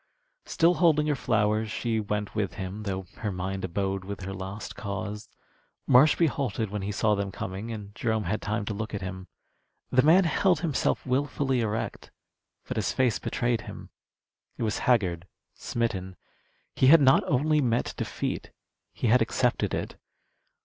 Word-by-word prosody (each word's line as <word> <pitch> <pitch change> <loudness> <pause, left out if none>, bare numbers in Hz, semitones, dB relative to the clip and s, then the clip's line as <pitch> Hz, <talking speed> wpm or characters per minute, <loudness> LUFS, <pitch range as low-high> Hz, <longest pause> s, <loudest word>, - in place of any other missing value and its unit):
Still 170 +2 +3
holding 160 -4 +3
her 150 -1 +1
flowers, 110 -3 +1
she 115 0 -1
went 105 -1 -3
with 105 -3 -2
him, 95 +2 -5
though 95 -2 -3
her 105 - -3
mind 95 +1 -4
abode 95 +1 -2
with 100 0 -6
her 95 +1 -5
lost 95 +2 -6
cause. 100 +1 -5 0.6
Marshby 150 +6 +6
halted 130 -8 -2
when 105 -1 -3
he 100 +1 -3
saw 105 +1 +2
them 100 -1 -2
coming, 95 +5 -5
and 105 -2 -7
Jerome 110 0 -1
had 100 +4 -2
time 105 0 -2
to 105 - -3
look 110 +1 -4
at 100 - -5
him. 95 0 -6 0.6
The 130 - +5
man 165 +7 +6
held 175 0 +2
himself 160 -6 0
wilfully 135 0 0
erect, 110 -1 -3 0.6
but - - -4
his - - 0
face 125 -4 +1
betrayed 120 -2 -1
him. - - -10 0.7
It - - -3
was 110 -2 -1
haggard, 90 -7 +2 0.3
smitten. 95 -6 -3 0.6
He 130 - +4
had 165 +4 +9
not 135 -2 +5
only 150 +3 +2
met 120 -2 0
defeat; - - -3 0.4
he - - -4
had 120 +2 +5
accepted 120 +2 +1
it. - - -4
110 Hz, 165 wpm, -27 LUFS, 100-130 Hz, 0.7 s, had